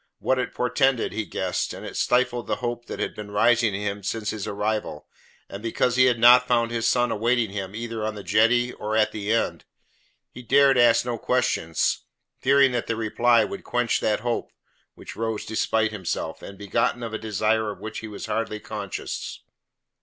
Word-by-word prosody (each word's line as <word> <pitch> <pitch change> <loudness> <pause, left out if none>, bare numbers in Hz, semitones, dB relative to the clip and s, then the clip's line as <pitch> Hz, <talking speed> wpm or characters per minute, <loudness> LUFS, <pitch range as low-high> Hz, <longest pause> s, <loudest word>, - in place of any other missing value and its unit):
What 130 0 0
it 125 - -3
portended, 125 0 +1
he 110 0 -3
guessed; - - -2
and - - -9
it - - -8
stifled 125 -1 +1
the - - 0
hope 120 -1 -4
that - - -6
had - - -2
been 105 -1 -8
rising 115 0 +3
in 100 - -4
him 100 0 -3
since 105 +2 -2
his 105 -3 -5
arrival, 105 -5 -3 0.4
and 100 - -8
because 115 +2 0
he 130 0 +5
had 125 -2 +3
not 125 +2 +7
found 115 -2 +2
his 115 -1 +1
son 120 -1 +2
awaiting 115 -1 +1
him 100 0 -5
either 115 -1 -4
on 110 0 -2
the 100 - -8
jetty 120 +4 +3
or 110 +1 -4
at 110 - +3
the 105 -1 -5
inn. 115 +1 0 0.7
He 125 - -10
dared 135 +3 +4
ask 120 -1 +4
no 120 -2 -3
questions, 85 -9 0 0.4
fearing 135 0 +4
that 120 -2 -2
the 115 - -1
reply 115 +2 +3
would 195 -1 -7
quench 120 -1 0
that 105 0 0
hope, 120 0 -2 0.4
which - - -10
rose 110 -1 -3
despite 110 0 0
himself, 95 -5 -4
and 100 - -10
begotten 115 +4 -1
of 115 -1 -5
a 110 - -3
desire 110 0 0
of 100 - -7
which 110 +2 -6
he 110 - -7
was 105 -2 -7
hardly 115 -1 -2
conscious. 105 -3 -6
115 Hz, 195 wpm, -24 LUFS, 105-120 Hz, 0.7 s, not